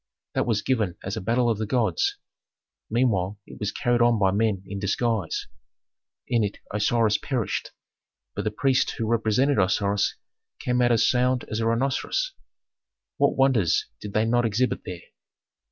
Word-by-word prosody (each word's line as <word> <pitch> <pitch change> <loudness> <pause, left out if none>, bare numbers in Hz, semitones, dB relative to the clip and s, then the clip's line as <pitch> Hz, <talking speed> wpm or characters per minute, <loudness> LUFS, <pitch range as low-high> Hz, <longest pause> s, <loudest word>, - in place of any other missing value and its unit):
That - - 0
was 110 -3 +1
given 110 -9 0
as 95 - -3
a - - -4
battle 120 +5 +1
of 115 -3 +1
the 110 - -2
gods; 135 - +1 0.7
meanwhile 105 -5 +1
it - - -12
was 105 -1 -2
carried 120 +2 +1
on 120 -1 +4
by 95 -2 +3
men 105 -2 0
in 100 +1 -6
disguise. 105 -2 -1 0.8
In 120 -3 +2
it 100 - -3 0.2
Osiris 110 +1 +2
perished, 125 -6 -2 0.6
but - - -3
the - - 0
priest 130 +5 +1
who 115 - -1
represented 115 +4 +2
Osiris 100 +1 +1 0.4
came 125 0 0
out 120 0 +4
as 115 - +4
sound 125 0 +2
as 110 - -1
a 115 - 0
rhinoceros. 135 - 0 0.8
What 140 0 +2
wonders 130 -11 +3
did 105 -1 -8
they 110 +1 +3
not 120 +1 +2
exhibit 115 +3 0
there! 90 -2 -6
115 Hz, 160 wpm, -25 LUFS, 105-125 Hz, 0.8 s, on